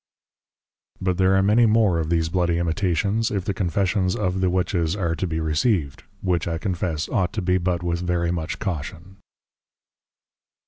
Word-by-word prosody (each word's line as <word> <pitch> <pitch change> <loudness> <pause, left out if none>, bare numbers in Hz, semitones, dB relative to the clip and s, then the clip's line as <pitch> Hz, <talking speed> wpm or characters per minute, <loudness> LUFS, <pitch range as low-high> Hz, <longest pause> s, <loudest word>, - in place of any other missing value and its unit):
But 95 -1 -1
there 95 0 +4
are 95 - +3
many 110 +4 +4
more 105 -6 +3
of 80 -1 -2
these 80 -1 +1
Bloody 85 -1 +1
Imitations, 95 +5 0
if 100 -3 -2
the 100 - -1
Confessions 95 +1 0
of 95 -2 -1
the 95 - +2
Witches 90 -2 0
are 90 -5 -1
to 95 - -2
be 80 -1 -2
Received; 80 - 0 0.2
which 90 -4 0
I 85 -1 -1
confess, 85 -4 -2
ought 95 -7 0
to 110 - -2
be 90 +1 +2
but 90 -1 -1
with 85 0 -1
very 85 -1 0
much 85 -1 -3
Caution. 90 +1 -5
90 Hz, 170 wpm, -23 LUFS, 85-95 Hz, 0.2 s, there